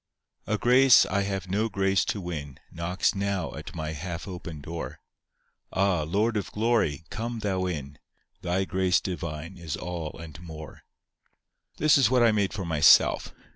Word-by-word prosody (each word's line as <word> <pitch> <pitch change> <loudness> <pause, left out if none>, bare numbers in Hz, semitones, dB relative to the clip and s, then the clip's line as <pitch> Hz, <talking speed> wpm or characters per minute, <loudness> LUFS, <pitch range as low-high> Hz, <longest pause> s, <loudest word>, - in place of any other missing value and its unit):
A 110 - 0
grace 125 +3 +6
I 100 - 0
have 95 -2 -3
no 105 +5 0
grace 95 -1 +1
to 105 - -2
win 75 -7 -6
Knocks 85 +3 0
now 100 -3 -2
at 80 +3 -9
my 80 -2 -3
half 85 +4 -6
open 85 -4 -7
door: 80 +3 -6 0.7
Ah, 95 -3 +1
Lord 105 +9 0
of 100 - -4
glory, 105 -9 +1
come 115 +1 -4
thou 95 -4 -1
in, 75 -5 -5 0.4
Thy 90 +2 0
grace 95 -1 +2
divine 85 0 -5
is 80 -4 -4
all 85 -3 -5
and 80 -1 -10
more. 80 -4 -10 1.0
This 155 -1 +5
was 135 -5 +4
what 125 -1 +4
I 115 - +5
made 100 -2 +1
for 100 -3 -4
myself. 80 -3 +5
90 Hz, 160 wpm, -27 LUFS, 80-100 Hz, 1.0 s, grace